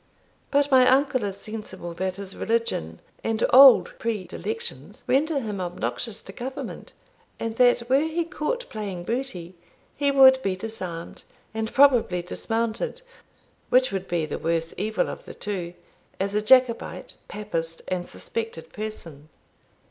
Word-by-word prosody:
But 285 0 +2
my 255 -1 +6
uncle 265 -2 +3
is 195 -1 -4
sensible 215 -5 -6
that 185 +2 -2
his 195 -1 -6
religion 220 - -1 0.2
and 225 0 +1
old 265 -1 +8
predilections 230 - -5
render 295 +2 +2
him 210 -6 -4
obnoxious 200 +5 -3
to 195 - -10
Government, 260 +4 -7 0.5
and 225 -1 -3
that, 245 -1 +4
were 265 +2 +4
he 330 +2 -1
caught 370 +9 -3
playing 200 -5 -5
booty, 195 -6 -4 0.4
he 285 0 +1
would 265 -1 +7
be 195 -6 -1
disarmed, 185 -5 -6 0.3
and 220 0 -3
probably 245 -10 +4
dismounted 230 - -2 0.7
(which 255 -1 +4
would 195 -1 -3
be 170 -3 0
the - - -5
worse 165 0 -1
evil 215 +1 -1
of - - -7
the - - -10
two), 180 -4 -5 0.4
as 195 +1 -1
a 210 - +1
Jacobite, 250 +1 +3
papist, 165 -6 -4
and 180 -1 -3
suspected 225 -8 -5
person." 170 -9 -7
220 Hz, 140 wpm, -25 LUFS, 185-260 Hz, 0.7 s, old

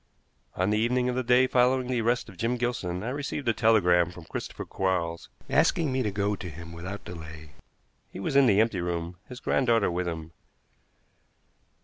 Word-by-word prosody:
On 95 +3 +1
the 105 - +2
evening 125 +2 +1
of 125 - -1
the 130 - +1
day 125 +1 +4
following 130 0 +3
the 125 -1 -1
arrest 120 +2 +1
of 100 - -12
Jim 115 +6 -1
Gilson 100 -7 -2
I 115 - -2
received 140 0 -4
a 115 - +4
telegram 90 -6 +4
from 85 -2 -11
Christopher - - -6
Quarles, 90 -3 -2 0.2
asking 160 -5 +2
me 130 0 0
to 110 - 0
go 100 +1 0
to 95 -2 -7
him 85 +1 -9
without 90 +4 -7
delay. 80 -3 -9 0.6
He - - -8
was 115 +8 -2
in 140 -2 +6
the 100 -2 +4
empty 110 -5 +2
room, 85 0 -3
his 125 - -8
granddaughter 120 -8 +2
with 90 +1 -2
him. 80 -1 -5
105 Hz, 190 wpm, -27 LUFS, 90-125 Hz, 0.6 s, in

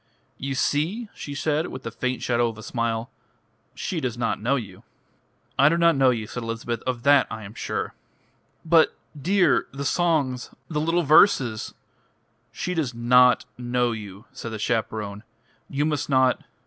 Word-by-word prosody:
"You 135 0 -3
see?" 170 - 0
she 145 - -7
said, 155 +3 0
with 130 - -8
the 115 - -5
faint 125 +3 -3
shadow 120 -1 +2
of 110 - -9
a 110 - -10
smile. 115 -1 -2 0.6
"She 175 - -3
does 125 -5 -3
not 115 -3 -1
know 125 +6 +2
you." 100 -8 -6 0.8
"I 140 +2 +7
do 165 - +1
not 170 -1 +4
know 135 -1 +4
you," 115 -3 -1
said 120 - -6
Elizabeth. 115 0 -4
"Of 125 -2 -2
that 140 -1 +5
I 110 -1 -6
am 100 +1 -9
sure." - - -3 0.7
"But, 165 0 +4 0.2
dear 175 +2 +2
the 140 +1 -5
songs 145 -7 +1 0.2
the 150 -2 -1
little 165 +2 +1
verses 135 - +4 0.4
" 115 +1 -43
"She 180 - -1
does 145 -8 -2
not 125 +1 +5
know 120 0 0
you," 105 -1 -8
said 120 -3 -7
the - - -3
chaperone. 105 -2 -2 0.5
"You 145 +2 0
must 150 0 -1
not.... 130 -2 +3
125 Hz, 170 wpm, -24 LUFS, 115-150 Hz, 0.8 s, I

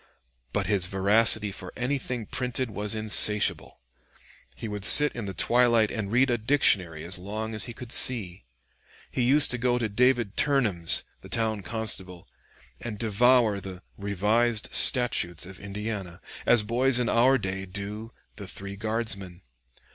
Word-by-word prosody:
But - - -2
his 100 -4 -1
voracity 105 +2 +2
for 90 -2 -6
anything 125 -2 -3
printed 125 +1 -4
was 105 +1 -3
insatiable. 105 -5 +1 0.7
He 115 - -7
would 105 -2 -6
sit 145 +6 +6
in 115 -3 -5
the 95 - -5
twilight 120 -3 +2
and 105 -3 -5
read 125 +2 +2
a 120 - -1
dictionary 95 - +2
as 90 +2 -2
long 110 +4 -6
as 110 - -1
he 120 - -9
could 125 -1 -10
see. 100 - +1 0.7
He 130 - -2
used 140 +5 +5
to 125 - 0
go 125 0 0
to 120 -2 -2
David 120 -1 0
Turnham's, 105 - +2 0.2
the - - -14
town 110 -2 -2
constable, 95 -4 -3 0.5
and 110 -3 -7
devour 115 0 +2
the 95 -1 -10
"Revised 105 +3 -1
Statutes 90 -9 +4
of 95 +1 -12
Indiana," 100 -3 -7 0.3
as 120 -3 +4
boys 125 +4 +1
in 125 -1 -1
our 130 +4 +3
day 95 -3 -5
do 105 +4 -7 0.3
the 100 -2 -9
"Three 100 +1 -7
Guardsmen." 105 -4 -5
110 Hz, 150 wpm, -26 LUFS, 100-120 Hz, 0.7 s, sit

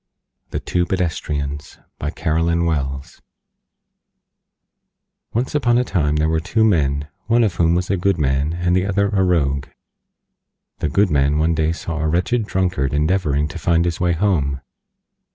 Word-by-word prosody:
THE - - -3
TWO 90 -1 -1
PEDESTRIANS 75 -5 -3 0.2
BY 75 - -2
CAROLYN 85 +2 0
WELLS 70 -4 -3 2.1
Once 120 +3 -2
on 120 -5 +2
a 125 - +3
time 75 -10 0
there 75 +1 +1
were 80 0 +1
two 105 +6 0
Men, 75 -8 +1 0.2
one 115 +1 +4
of 105 -5 +1
whom 85 -1 +2
was 90 +2 -1
a 95 - +1
Good 95 +1 +1
Man 70 0 0
and 90 +1 0
the 95 +1 +1
other 100 0 +1
a 100 -2 +1
Rogue. 70 -7 +1 1.1
The - - -1
Good 100 +6 +2
Man 70 0 +2
one 80 +2 +2
day 80 0 +1
saw 85 -1 -4
a 80 - 0
Wretched 95 +8 0
Drunkard 90 -9 0
endeavoring 75 -2 +1
to 85 - -7
find 85 +1 +2
his 85 -2 -2
way 90 -1 +2
Home. 80 -8 0
85 Hz, 160 wpm, -20 LUFS, 75-95 Hz, 2.1 s, one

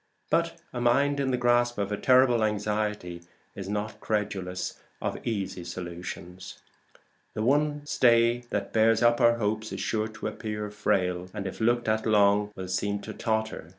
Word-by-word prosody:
But - - +1
a 120 - -3
mind 140 +4 +3
in 135 -1 0
the 125 - +1
grasp 120 0 +2
of 100 0 -2
a - - +1
terrible 125 +1 +4
anxiety 105 -4 -2 0.3
is 95 -1 -7
not 105 +1 -3
credulous 95 -4 -3 0.2
of - - -3
easy 100 -5 -3
solutions. 90 +1 -7 0.8
The 110 - -1
one 145 +3 +1
stay 120 -3 +4
that - - -3
bears 110 +1 +4
up 120 +1 +4
our 120 0 +5
hopes 110 0 -2
is - - -5
sure 110 -1 -1
to 110 0 -9
appear 105 -1 -4
frail, 90 -3 0
and 100 -2 -4
if 95 - -6
looked 120 +1 +2
at 110 +1 +1
long 105 -1 +4
will 95 -1 -6
seem 100 +2 -1
to 110 - -7
totter. 110 -7 -2
110 Hz, 165 wpm, -27 LUFS, 100-120 Hz, 0.8 s, our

